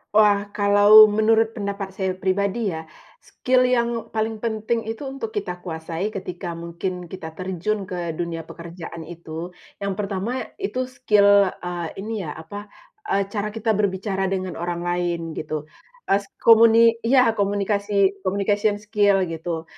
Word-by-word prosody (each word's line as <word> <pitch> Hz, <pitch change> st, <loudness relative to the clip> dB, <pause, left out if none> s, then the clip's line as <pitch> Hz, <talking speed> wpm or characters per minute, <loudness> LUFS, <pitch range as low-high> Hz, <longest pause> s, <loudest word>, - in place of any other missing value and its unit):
Wah, 210 Hz, -1 st, +6 dB, 0.2 s
kalau 205 Hz, +1 st, +8 dB
menurut 225 Hz, +1 st, +3 dB
pendapat 200 Hz, -2 st, -3 dB
saya 190 Hz, -1 st, -1 dB
pribadi 200 Hz, +4 st, 0 dB
ya, 160 Hz, -, -6 dB, 0.4 s
skill 255 Hz, 0 st, +1 dB
yang 235 Hz, -1 st, +1 dB, 0.2 s
paling 220 Hz, 0 st, -1 dB
penting 225 Hz, 0 st, -1 dB
itu, 225 Hz, +5 st, -5 dB
untuk 265 Hz, -5 st, -5 dB
kita 185 Hz, -5 st, -4 dB
kuasai 165 Hz, +3 st, -4 dB
ketika 185 Hz, -3 st, -6 dB
mungkin 170 Hz, +2 st, -5 dB
kita 165 Hz, -2 st, -8 dB
terjun 190 Hz, +4 st, -3 dB
ke 185 Hz, -, -5 dB, 0.2 s
dunia 165 Hz, -1 st, -3 dB
pekerjaan 170 Hz, -1 st, -9 dB
itu, 170 Hz, +1 st, -8 dB, 0.2 s
yang 200 Hz, -1 st, -2 dB
pertama 210 Hz, +5 st, -3 dB
itu 390 Hz, -10 st, -3 dB
skill, 250 Hz, -6 st, +2 dB, 0.4 s
eee, 175 Hz, -1 st, -3 dB, 0.2 s
ini 220 Hz, -, -5 dB, 0.2 s
ya, -, -, -6 dB
apa, 205 Hz, +6 st, -9 dB, 0.4 s
eee, 200 Hz, -, +1 dB
cara 205 Hz, 0 st, -2 dB
kita 225 Hz, 0 st, 0 dB
berbicara 195 Hz, -1 st, 0 dB
dengan 185 Hz, -3 st, -3 dB
orang 175 Hz, 0 st, -3 dB
lain 175 Hz, -1 st, -2 dB
gitu, 155 Hz, -1 st, -4 dB, 0.5 s
es 200 Hz, +1 st, +2 dB, 0.2 s
komuni 230 Hz, 0 st, +7 dB, 0.3 s
iya, 260 Hz, +2 st, +5 dB, 0.2 s
komunikasi, 200 Hz, 0 st, 0 dB, 0.3 s
communication 205 Hz, +2 st, +1 dB
skill 205 Hz, -2 st, +3 dB
gitu. 165 Hz, 0 st, -4 dB
200 Hz, 140 wpm, -23 LUFS, 175-215 Hz, 0.5 s, kalau